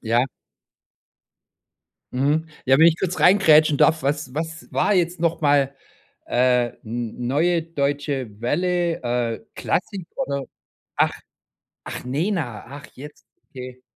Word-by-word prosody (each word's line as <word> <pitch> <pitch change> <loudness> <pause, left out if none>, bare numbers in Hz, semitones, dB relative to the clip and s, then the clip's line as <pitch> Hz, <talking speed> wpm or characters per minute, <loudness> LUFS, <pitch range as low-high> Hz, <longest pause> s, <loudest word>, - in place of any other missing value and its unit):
ja. 120 +2 +2 1.9
Mhm. 145 +5 +1 0.2
Ja, 135 0 +5
wenn 165 - +8
ich 170 0 +4
kurz 185 -1 -2
reingrätschen 155 -6 +6
darf: 160 0 +4
Was 140 -2 -2
was 165 +2 -5
war 210 - +2
jetzt 175 -1 0
noch 170 0 0
mal, 145 -2 +3 0.5
äh, 125 0 +3 0.2
n 120 +1 -4
neue 165 +6 +2
Deutsche 140 -7 -2
Welle, 175 +6 0
äh, 120 -2 -1
Klassik 185 -1 -2
oder? 140 - -2 0.5
Ach, - - +2 0.7
ach, - - -6
Nena, 145 - -2
ach 140 +2 -10
jetzt, 145 +3 -12 0.2
okay. 130 -1 -9
145 Hz, 120 wpm, -23 LUFS, 125-165 Hz, 1.9 s, wenn